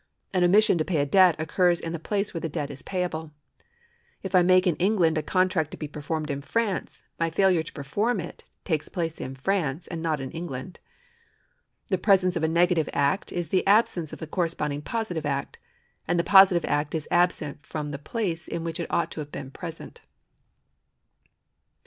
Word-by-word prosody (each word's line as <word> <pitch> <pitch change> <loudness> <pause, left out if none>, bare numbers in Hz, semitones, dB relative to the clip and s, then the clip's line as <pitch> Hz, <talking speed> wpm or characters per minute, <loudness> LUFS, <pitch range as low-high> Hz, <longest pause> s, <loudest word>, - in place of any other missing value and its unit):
An 185 -1 +2
omission 190 0 +4
to - - +2
pay 170 0 -1
a 145 - +2
debt 180 +3 +5
occurs 175 +2 +2
in 165 - -5
the 170 - -4
place 200 +5 -2
where 165 - -4
the 165 - -3
debt 145 -1 -3
is 135 -1 -6
payable.^ 175 -4 -3 0.9
If 190 -1 -5
I 185 - +6
make 185 +1 +4
in 175 -4 +2
England 180 -4 +2
a 155 - +1
contract 185 -2 +1
to - - -9
be 150 - -5
performed 150 +1 -4
in 140 0 -3
France, 210 +3 -2 0.2
my 165 0 +1
failure 185 0 +3
to 160 - -8
perform 205 - -1
it 175 - -8 0.2
takes 155 -3 -1
place 165 -3 -3
in 130 +1 -5
France 155 0 -1
and 165 -2 -6
not 160 -2 0
in 130 -1 -5
England. 165 -2 -6 1.1
The 190 -3 +1
presence 185 -2 +3
of 170 - -1
a 160 - +2
negative 170 -1 +2
act 145 +8 0
is 175 -3 -3
the 185 +2 +1
absence 195 -6 +3
of - - -7
the - - -6
corresponding 155 -4 -2
positive 175 -5 -3
act. 140 -1 -3 0.5
and 175 - +1
the 170 - +2
positive 190 -1 +6
act 145 +2 -1
is 155 -2 -3
absent 175 -5 +1
from 150 -1 -5
the 140 0 -6
})lace 175 -8 -2
in 170 - -4
which 165 +1 -4
it 170 - -4
ought 170 - 0
to - - -6
have 145 -1 -6
been 135 -1 -7
present. 165 +2 -8
165 Hz, 195 wpm, -26 LUFS, 150-185 Hz, 1.1 s, I